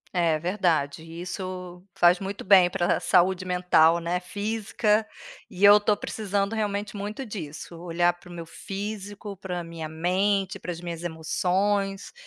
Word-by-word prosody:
É 165 -3 +3
verdade, 165 -5 0
isso 180 +1 -7
faz 175 +1 +5
muito 195 +1 -5
bem 185 -2 +7
para 175 -1 +1
saúde 185 +1 +3
mental, 180 -2 +4
né, 170 +1 -1
física, 210 +2 0 0.4
e 195 +1 +2
eu 205 +1 +10
estou 210 0 +1
precisando 200 -1 -2
realmente 210 -1 -2
muito 210 +6 -5
disso, 170 -6 -7
olhar 175 0 +1
para 175 +1 -17
o - - -11
meu 170 -1 -7
físico, 205 +3 -6
para 180 -2 -5
minha 165 -2 -7
mente, 190 +4 0
para 180 - -5
as 170 - -6
minhas 170 -1 -6
emoções, 190 +4 -1
185 Hz, 145 wpm, -26 LUFS, 175-200 Hz, 0.4 s, eu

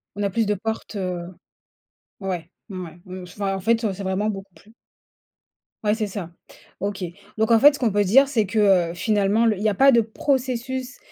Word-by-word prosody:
On 205 - -3
a 200 - +1
plus 225 +3 0
de 210 - +1
portes, 220 +2 -5
heu, 180 -3 -3 1.0
ouais, 180 -4 -4 0.2
mmh, 185 -3 -6
ouais 170 +1 -12
mmh, 185 -1 -8
enfin 195 +2 -3
en - - -5
fait, 230 +4 +2
heu, 210 - +1
c'est 195 +1 -7
vraiment 190 +3 0
beaucoup 195 -2 -8
plus 215 - -20 1.1
Ouais, 210 0 +2
c'est 220 -2 -2
ça. 190 -4 -6 0.5
OK. 200 0 -3 0.3
Donc 220 +2 +1
en 225 - +6
fait, 290 +4 +8
ce - - -9
qu'on 235 -4 +1
peut 205 +1 +2
dire, 270 +8 +5
c'est 230 -6 +1
que, 195 -4 +3
heu, - - -8
finalement, 210 +3 +2
le 220 -3 +2
il 200 - -5
y - - +3
a - - 0
pas 270 +8 +6
de 235 - +5
processus 255 +2 -2
210 Hz, 215 wpm, -23 LUFS, 190-230 Hz, 1.1 s, fait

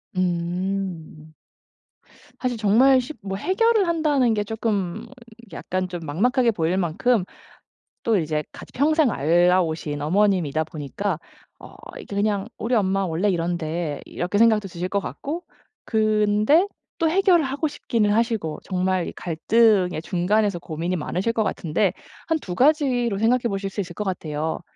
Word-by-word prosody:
음. 175 -3 -3 1.1
사실 250 -2 -2
정말 240 +6 +5
시 255 +5 -7
뭐 195 -1 -4
해결을 405 - +2
한다는 295 -8 +2
게 210 -1 0
쪼끔 210 -3 -2 0.5
약간 185 0 -3
좀 175 -1 -6
막막하게 240 - +2
보일 175 -2 0
만큼 190 +5 +1 0.8
또 225 -2 +2
이제 155 -2 -1
같이 - - -12
평생 300 -1 +3
알아 175 +4 +3
오신 155 -3 -4
어머님이다 165 -2 +1
보니까 160 +4 -4 0.4
어 - - -13 0.2
이게 - - -9
그냥 205 -1 0
'우리 240 +2 -1
엄마 195 -2 +1
원래 170 +5 0
이런데.' 165 -3 -2
이렇게 180 +4 -2
생각도 220 -3 +4
드실 175 +1 -4
것 200 +1 0
같고 310 - -5 0.4
근데 215 - +3 0.3
또 325 - +2
해결을 365 -3 +4
하고 275 +4 -1
싶기는 225 -7 -1
하시고 220 -9 0
정말 185 -1 0
이 - - -6
갈등의 185 0 +2
중간에서 195 +2 +1
고민이 170 +2 -3
많으실 185 +7 -1
것 225 -1 0
같은데 185 0 0 0.4
한 325 -1 +2
2 180 - -6
가지로 255 - +2
생각해 235 +3 +2
보실 195 -1 -3
수 200 - -4
있을 175 -2 -6
것 210 - -4
같아요. 160 -4 -3
195 Hz, 295 characters per minute, -23 LUFS, 175-230 Hz, 1.1 s, 정말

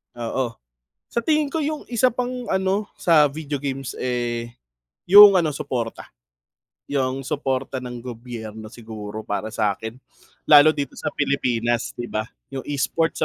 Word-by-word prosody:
Oo. 120 0 -2 0.6
Sa 235 - -2
tingin 305 -2 +2
ko 325 - -3
yung 305 0 -2
isa 245 0 +2
pang 250 0 -3
ano, 190 +2 +1
sa 160 -4 +4
video 145 0 -3
games 135 -1 -5
eh, 120 -2 -2 0.5
yung 200 +1 +10
ano 155 -4 +1
suporta. 120 -4 -4 0.8
Yung 135 -1 -2
suporta 135 -2 -2
ng 125 -1 -6
gobyerno 110 -3 -8
siguro 110 -2 -8
para 105 +1 -3
sa'kin, 110 +2 -2 0.5
lalo 150 +1 +8
dito 145 -2 -2
sa - - -4
Pilipinas 120 -5 0
di 120 - -3
ba, 110 -2 -2 0.3
yung 135 - -3
e-sports 160 +3 0
135 Hz, 135 wpm, -23 LUFS, 120-165 Hz, 0.8 s, yung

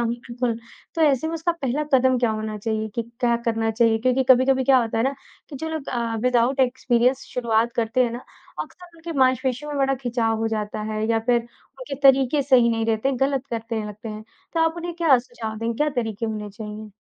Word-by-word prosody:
हो 235 - +1
बिल्कुल, 235 0 -3 0.4
तो 325 - +1
ऐसे 290 0 +3
में 330 - -3
उसका 330 +1 0
पहला 295 -2 -2
कदम 260 -1 +4
क्या 235 -2 +2
होना 215 0 -3
चाहिए 220 0 -2
कि 235 - -1 0.2
क्या 235 -1 +3
करना 225 -1 0
चाहिए? 225 0 +3
क्योंकि 255 +3 +2
कभी-कभी 260 +1 +5
क्या 265 -1 +6
होता 225 -2 -1
है 225 - +2
ना, 275 +1 0 0.3
कि 285 - -8
जो 320 +4 -4
लोग 315 -3 -5
अ, 235 -2 -2
विदाउट 250 +2 +2
एक्सपीरियंस 250 0 +2
शुरुआत 235 -1 +1
करते 235 +2 +2
हैं 235 - -1
ना, 240 +2 -7 0.4
अक्सर 355 -2 -15
उनके 330 0 -7
मासपेशियों 260 +2 +1
में 285 - -3
बड़ा 270 0 +2
खिंचाव 235 -2 0
हो 225 0 0
जाता 215 -1 -3
है 215 0 -1
या 225 - +3
फिर 240 -1 +4
उनके 275 - -11
तरीके 270 +1 +5
सही 255 -3 +5
नहीं 225 0 -1
रहते, 225 +5 +1
गलत 270 +1 0
करते 230 -1 -3
हैं 215 - -2
लगते 210 +2 -8
हैं, 215 0 -7 0.3
तो 330 - 0
आप 325 +1 +2
उन्हें 345 0 -5
क्या 320 -7 +5
सुझाव 240 -3 -7
देंगे? 230 +1 -2
क्या 300 0 +2
तरीके 225 0 -3
होने 210 -1 -4
चाहिए? 210 +1 -8
245 Hz, 220 wpm, -23 LUFS, 225-270 Hz, 0.4 s, क्या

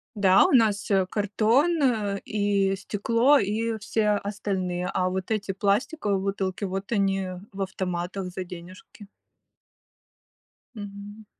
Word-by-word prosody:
Да, 195 -2 +5
у - - +1
нас, 215 -6 +3
э, 190 -2 +3
картон 220 - +2 0.5
и 200 -2 +1
стекло, 230 +8 +2
и 220 +2 -1
все 210 +1 0
остальные, 190 -3 -2
а 185 0 +1
вот 190 +3 -4
эти 205 -2 -1
пластиковые 205 - 0
бутылки, 195 0 -2
вот 195 +2 -4
они 195 -3 +1 0.2
в 195 0 -7
автоматах 185 0 -3
за 185 +1 -5
денежки. 180 +3 -12 1.7
Мгм. 205 +1 -9
200 Hz, 115 wpm, -26 LUFS, 190-210 Hz, 1.7 s, Да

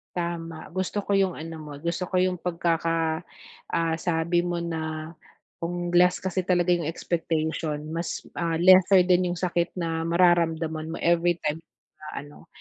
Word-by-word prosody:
Tama, 170 -2 -4
gusto 190 +2 -2
ko 200 - 0
'yong 195 -2 +2
ano 165 +1 -6
mo, 150 -1 -9
gusto 170 +4 -3
ko 185 - 0
'yong 180 -1 +1
pagkaka 165 -1 0 0.5
ah, 165 -1 0
sabi 170 0 +1
mo 175 0 -2
na 160 -1 -4 0.5
kung 175 +1 -3
less 180 +1 +5
kasi 190 0 -2
talaga 180 -1 +2
'yong 170 -3 -1
expectation, 160 -2 -2 0.2
mas, 170 0 -4
ah, 165 -1 -1
lesser 185 +1 +6
din 180 0 +3
'yong 175 - -3
sakit 175 -1 0
na 165 -2 -1
mararamdaman 165 -2 +2
mo 165 - -4
everytime 170 -2 +1 0.4
na 155 - -10 0.2
ano 145 - -16
170 Hz, 150 wpm, -26 LUFS, 165-180 Hz, 0.5 s, lesser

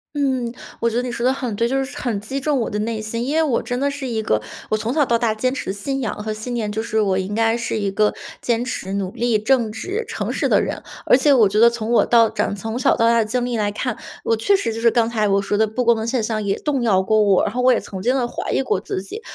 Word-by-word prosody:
嗯， 260 -4 -1 0.3
我 235 - +2
觉 230 - -3
得 245 - +1
你 250 -1 -4
说 235 - -4
得 255 - +4
很 250 -5 -4
对， 230 +3 0
就 270 +1 0
是 265 - -8
很 235 -6 -2
击 240 +7 -4
中 290 0 0
我 - - -2
的 210 - -2
内 225 +1 -2
心。 230 +2 -3
因 295 +4 -1
为 320 - +4
我 280 -7 +1
真 245 - -3
的 280 +2 +1
是 280 -2 -5
一 225 -2 -2
个， 110 - +1 0.3
我 215 - +2
从 220 +2 -2
小 300 -2 +3
到 235 -3 +1
大 230 -2 +1
坚 255 +4 0
持 265 - -4
信 270 +8 -3
仰 230 - -2
和 215 - -2
信 220 +3 -5
念， 215 -3 -2
就 220 - -2
是 220 -1 -2
我 190 -2 +1
应 190 +2 -3
该 225 0 +2
是 225 -1 -2
一 200 -2 -1
个 210 +2 +1 0.3
坚 235 0 0
持 195 -6 -4
努 195 -2 -2
力、 235 0 0
正 225 +1 +2
直 400 - -4
诚 - - -3
实 - - 0
的 - - +4
人。 - - -4 0.2
而 - - +4
且 265 +3 +4
我 225 -5 +5
觉 210 +3 +1
得 235 - +8
从 235 -1 -3
我 235 - +4
到 230 -2 +5
长 200 - -1
从 225 +4 -4
小 255 - +3
到 230 - +3
大 235 0 +4
的 225 - +3
经 245 +3 -1
历 245 -2 -2
来 205 -1 0
看， 235 +3 -3 0.3
我 225 - +2
确 310 - +3
实 305 - -2
就 225 - -5
是 230 0 +4
刚 230 0 +1
才 215 -3 +1
我 195 0 +2
说 205 +1 -1
的 220 - +4
不 230 +4 -2
公 235 - +5
的 220 0 -3
现 235 -1 0
象 215 0 -2
也 200 -1 -1
动 280 -4 -1
摇 195 -5 +3
过 215 +3 +2
我， 195 -3 +3
然 210 - -2
后 250 - -2
我 255 - +5
也 - - +1
曾 190 - -7
经 245 +7 +1
地 250 -2 +1
怀 - - -5
疑 - - +1
过 190 - 0
自 190 -1 -4
己。 195 - -7
230 Hz, 330 characters per minute, -21 LUFS, 215-250 Hz, 0.3 s, 得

